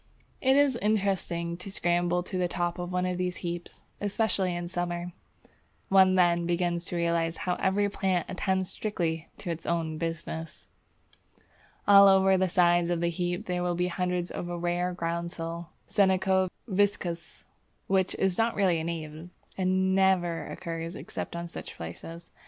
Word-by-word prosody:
It 265 0 +4
is 285 -4 +4
interesting 190 -5 0
to 185 +2 -8
scramble 175 -1 +1
to 185 - -7
the 180 -1 +1
top 175 0 -2
of 175 0 -4
one 180 0 0
of 180 0 -2
these 180 0 -1
heaps, 175 0 -5 0.2
especially 200 -3 0
in 175 0 -3
summer. 175 0 -3 0.8
One 190 -1 +6
then 175 -2 +3
begins 175 0 0
to 180 - -4
realize 170 -1 0
how 180 - +1
every 200 +1 +2
plant 190 -3 0
attends 190 0 -1
strictly 165 -6 -2
to 175 - -4
its 165 0 -6
own 160 -2 -1
business. 165 0 -5 1.2
All 200 -1 +9
over 190 0 +5
the 185 0 +2
sides 175 -1 +4
of 175 -1 0
the 170 0 +1
heap 175 +1 -2
there 180 -1 -1
will 175 0 0
be 180 +1 0
hundreds 180 0 -1
of 175 - -5
a 175 - -3
rare 175 +1 0
groundsel 170 0 -3 0.2
(Senecio 190 -1 +3 0.2
viscosus), 190 -4 -1 0.4
which 190 -1 +1
is 190 0 0
not 230 +1 +2
really 185 -5 +2
a - - -3
native, 160 0 -5 0.3
and 190 0 +1
never 190 -3 +2
occurs 165 0 -5
except - - -6
on 170 0 -4
such 170 - -8
places. 165 - -8
175 Hz, 160 wpm, -28 LUFS, 170-190 Hz, 1.2 s, All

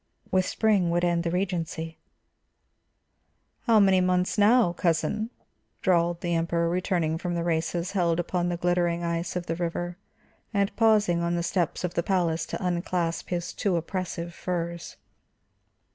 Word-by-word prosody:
With 185 -1 +2
spring 205 -6 +2
would 175 +1 +1
end 170 -1 +2
the 170 - -1
regency. 165 -3 -3 1.7
"How 225 -2 +6
many 190 -2 +5
months 180 0 +1
now, 210 -3 +4
cousin?" 180 +6 0 0.5
drawled 170 -3 +2
the 175 -1 -1
Emperor, 170 0 +1
returning 170 -2 0
from 175 -1 -2
the 170 - -1
races 170 +2 -1
held 175 -4 +1
upon 175 0 -1
the 175 - -2
glittering 175 -1 +1
ice 170 +1 -2
of 180 -1 -2
the 165 - -2
river, 175 +1 -3 0.6
and 200 0 +1
pausing 215 -6 +3
on 170 0 0
the 170 - -1
steps 175 -1 -1
of 180 - -2
the - - +1
palace 170 -3 0
to - - -4
unclasp 175 -1 -1
his 175 -1 -3
too 195 -4 0
oppressive 170 0 -3
furs. 170 -1 -4
175 Hz, 150 wpm, -27 LUFS, 170-185 Hz, 1.7 s, How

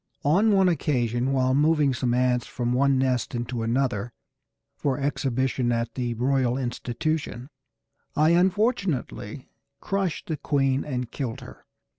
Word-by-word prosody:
On 195 +10 +4
one 195 -2 +4
occasion, 125 -7 0
while 130 -1 +2
moving 150 -1 +3
some 120 -1 0
ants 125 -1 +1
from 120 -1 -2
one 135 +1 +3
nest 130 -2 0
into 120 0 -3
another 120 -1 -1 0.6
for 135 -3 -1
exhibition 130 -3 0
at 115 0 -1
the 120 -2 -2
Royal 130 0 +1
Institution, 130 +2 -3 0.6
I 155 +2 +4
unfortunately 180 - 0 0.3
crushed 195 -4 -2
the 160 - -3
queen 135 -2 +1
and 125 -4 -4
killed 125 -5 -4
her. - - -13
130 Hz, 130 wpm, -25 LUFS, 120-150 Hz, 0.6 s, On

